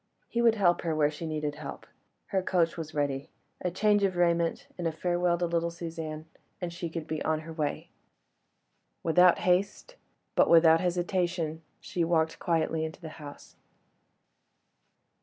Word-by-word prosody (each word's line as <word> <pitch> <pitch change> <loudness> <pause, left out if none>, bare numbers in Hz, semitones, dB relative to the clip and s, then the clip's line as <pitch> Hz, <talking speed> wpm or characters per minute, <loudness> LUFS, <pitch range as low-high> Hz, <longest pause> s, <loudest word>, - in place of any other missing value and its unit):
He 235 - -1
would 230 -1 +5
help 180 -5 +3
her 165 -2 -1
where 150 -1 +3
she 160 +2 -6
needed 150 -2 -2
help; 150 -2 -8 0.4
her 190 - +1
coach 175 -3 +1
was 160 -2 -7
ready. 140 -1 -1 0.3
A 180 - +1
change 205 +3 +2
of 190 -2 +1
raiment, 170 -1 +1
and 175 -2 -2
a - - 0
farewell 175 +1 0
to 175 - 0
little 170 0 0
Suzanne, 160 -2 -6 0.3
and 175 -2 -4
she 170 -1 -4
could 160 -1 -5
be 155 -1 -4
on 155 0 0
her 165 +1 -9
way. 150 -3 -3 1.1
Without 180 +2 +5
haste, 195 - 0 0.4
but - - +4
without 165 -1 +6
hesitation, 175 -2 -1 0.2
she 180 -5 -2
walked 160 -1 +1
quietly 165 -2 0
into 160 0 -5
the 165 -3 -8
house. 145 -1 -11
170 Hz, 160 wpm, -29 LUFS, 160-180 Hz, 1.1 s, without